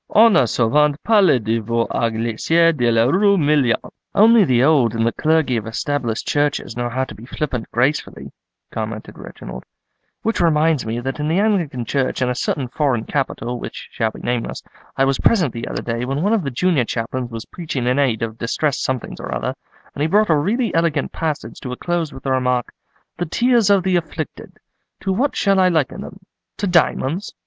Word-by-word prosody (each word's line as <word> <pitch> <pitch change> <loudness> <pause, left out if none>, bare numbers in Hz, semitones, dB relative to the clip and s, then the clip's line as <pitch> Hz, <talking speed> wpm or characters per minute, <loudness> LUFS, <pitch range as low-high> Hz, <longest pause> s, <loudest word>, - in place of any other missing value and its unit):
On 225 -1 +6
a 135 -8 +4
souvent 145 +7 +2
parlé 205 - +4
de 110 +1 -1
vous 115 +1 -1
à 115 - +1
l'église 120 +10 +2
de 120 -4 +1
la 115 -1 +3
rue 200 +8 +3
Million.'" 145 -6 +3 0.4
"Only 225 +1 +6
the 125 -4 +3
old 135 -7 +3
and 115 0 +1
the 115 - +2
clergy 155 -5 +1
of 110 0 -4
Established 120 0 -2
churches 145 -5 0
know 120 0 -2
how 130 +2 -1
to 130 - -7
be 110 +4 -12
flippant 130 -5 -4
gracefully," 130 +6 -1 0.4
commented 110 -1 -6
Reginald; 65 - -9 0.6
"which 225 -3 0
reminds 155 -5 +2
me 115 +2 -2
that 135 +3 -4
in 150 - -1
the 165 +3 +1
Anglican 170 - 0
Church 130 +2 -1
in 125 - +1
a - - 0
certain 125 +1 -2
foreign 130 -3 0
capital, 125 -3 -3
which - - -8
shall 110 - 0
be - - -11
nameless, 120 -1 -3 0.3
I 135 - +4
was 135 -1 0
present 175 - +2
the 115 - -5
other - - -4
day 115 0 -2
when 135 +5 -2
one 205 +3 +2
of 225 - +2
the 140 - -2
junior 140 0 +1
chaplains 120 +2 -3
was 115 -1 -7
preaching 150 -8 -4
in 125 +3 +1
aid 120 -6 +1
of 115 0 -5
distressed 140 +4 -1
somethings 130 -2 -3
or - - -6
other, - - -2 0.4
and - - -6
he 150 - +2
brought 210 +2 +3
a - - +5
really 215 - 0
eloquent 165 -2 0
passage 155 -3 -4
to 125 - -6
a - - -7
close 175 -3 -2
with 135 - -11
the 135 - -1
remark, 125 -2 0 0.4
'The 175 - -2
tears 235 +3 +2
of 200 -2 +4
the 185 -1 +2
afflicted, 160 -2 -6 0.5
to 195 - -1
what 265 +9 0
shall 195 -1 +2
I 185 -1 +5
liken 160 -6 0
them—to 195 +2 -9
diamonds? 175 0 +1
140 Hz, 200 wpm, -20 LUFS, 120-170 Hz, 0.6 s, On